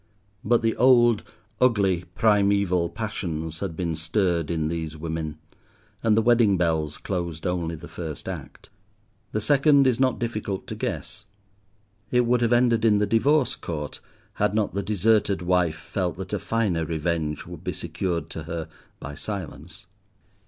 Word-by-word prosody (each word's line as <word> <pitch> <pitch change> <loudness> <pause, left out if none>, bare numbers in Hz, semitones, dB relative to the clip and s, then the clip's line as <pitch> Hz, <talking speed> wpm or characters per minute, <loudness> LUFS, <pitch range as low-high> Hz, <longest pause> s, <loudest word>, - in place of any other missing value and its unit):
But 115 +2 +2
the 115 0 +2
old, 120 -3 +5 0.4
ugly, 100 -8 +2
primeval 100 -5 +3
passions 80 -7 -4
had 80 - -4
been 85 -2 -2
stirred 85 0 0
in 80 -2 0
these 80 -1 -4
women, 80 -1 -4 0.6
and 110 -2 +3
the 115 - +4
wedding 115 -5 +4
bells 80 -3 0
closed 85 -4 -4
only 85 -2 -1
the 85 +2 -10
first 80 -4 -6
act. - - -8 0.6
The 110 - 0
second 140 +3 +4
is 130 -2 +2
not 130 -2 +2
difficult 110 -5 -3
to - - -6
guess. 110 -1 -4 0.8
It 125 - +3
would 120 0 +2
have 120 -1 +2
ended 120 -2 +3
in 110 -2 +5
the 105 - +2
Divorce 130 +7 +3
Court 75 -3 -6 0.4
had 105 0 +2
not 110 -2 0
the 100 - -1
deserted 105 -1 +2
wife 90 -3 +2
felt 90 -4 -3
that 95 +2 -6
a 105 - 0
finer 100 -5 0
revenge 80 -1 -2
would 85 -1 -10
be 90 - -2
secured 85 +2 -3
to 80 - -6
her 80 -1 -5 0.3
by 75 - -7
silence. 90 -1 -7
95 Hz, 155 wpm, -25 LUFS, 80-110 Hz, 0.8 s, old